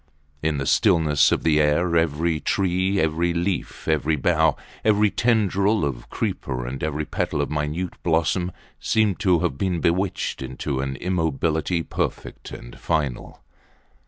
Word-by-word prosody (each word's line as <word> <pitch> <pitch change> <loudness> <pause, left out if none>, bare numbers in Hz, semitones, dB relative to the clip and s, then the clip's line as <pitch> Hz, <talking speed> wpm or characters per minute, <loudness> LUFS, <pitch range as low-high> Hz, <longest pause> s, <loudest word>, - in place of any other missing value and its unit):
In 80 -1 0
the 70 - -2
stillness 75 +1 +3
of - - 0
the 75 -2 +3
air 85 +4 +2
every 80 0 +1
tree, 95 +2 0
every 85 +2 +1
leaf, 90 +2 -3
every 80 0 +1
bough, 80 0 +2 0.3
every 105 -1 +3
tendril 105 -4 +2
of 60 -4 -5
creeper 60 -1 -3
and 65 +3 -5
every 75 0 -2
petal - - -2
of 70 - -1
minute 75 +4 -2
blossoms 85 +2 +1 0.3
seemed 110 -3 +1
to 90 -6 +3
have 65 - -1
been 90 -3 0
bewitched 90 0 -1
into 65 +1 -4
an 65 0 -2
immobility 80 0 -1
perfect - - -4
and - - -10
final. 75 -6 -2
80 Hz, 140 wpm, -23 LUFS, 75-90 Hz, 0.3 s, stillness